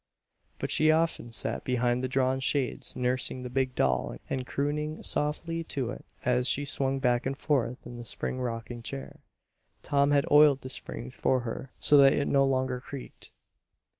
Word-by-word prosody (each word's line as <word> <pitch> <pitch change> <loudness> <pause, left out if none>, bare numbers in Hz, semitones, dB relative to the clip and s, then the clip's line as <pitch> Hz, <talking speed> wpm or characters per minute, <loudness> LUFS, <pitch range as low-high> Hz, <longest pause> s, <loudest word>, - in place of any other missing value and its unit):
But - - -3
she 155 - +3
often 160 -6 +1
sat 115 - 0
behind 125 0 0
the - - +1
drawn 130 0 +1
shades 135 0 0
nursing 125 0 -1
the 125 - -6
big 130 0 0
doll 65 -2 0
and 130 -1 -2
crooning 150 +2 -2
softly 165 +3 -1
to 130 -6 -2
it - - -8 0.2
as 125 0 +2
she 145 +3 +1
swung 135 -1 0
back 125 -1 +1
and 135 0 -3
forth 125 -5 -1
in 120 - -8
the 120 - -7
spring 130 +2 -2
rocking 120 0 -4
chair. 70 -11 -7 0.6
Tom 140 0 +2
had 145 0 +3
oiled 145 -2 +6
the 130 - -5
springs 65 - -6
for 130 -1 +1
her 125 +2 -6
so 145 - +4
that 135 -1 +7
it 145 - 0
no 135 0 +4
longer 130 -1 0
creaked. 135 0 -9
130 Hz, 175 wpm, -28 LUFS, 125-140 Hz, 0.6 s, that